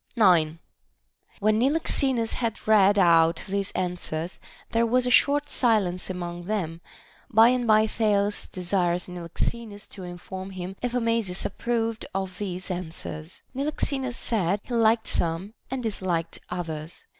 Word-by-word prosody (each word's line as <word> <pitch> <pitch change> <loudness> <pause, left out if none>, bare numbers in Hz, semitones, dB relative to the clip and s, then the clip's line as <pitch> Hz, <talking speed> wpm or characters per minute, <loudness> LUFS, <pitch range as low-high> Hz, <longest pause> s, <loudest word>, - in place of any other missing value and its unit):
9. 170 -8 +4 0.8
When 215 +1 +3
Niloxenus 265 -3 +1
had 230 -4 -3
read 205 -2 +6
out 165 -3 +5
these 200 0 -1
answers, 175 -2 -3 0.3
there 230 0 +3
was 250 +2 +2
a 250 - +1
short 290 +3 +4
silence 210 -11 +1
among 175 -1 -5
them; 175 -5 -2 0.5
by 225 -1 +7
and 250 -1 +1
by 215 0 +6
Thales 210 -2 +1
desires 180 -1 0
Niloxenus 205 +5 -4
to 195 - -9
inform 185 +2 -7
him 185 0 -6
if 245 0 -2
Amasis 230 -6 0
approved 230 +1 -1
of 190 -1 -3
these 185 -2 -4
an 180 -2 -3
swers. 155 +1 -7
Niloxenus 270 -2 -1
said, 200 -4 +1
he 245 - -7
liked 225 -1 +3
some 170 +5 -1 0.2
and 260 0 -3
disliked 180 -6 -2
others. 165 -2 -5
200 Hz, 135 wpm, -26 LUFS, 175-230 Hz, 0.8 s, by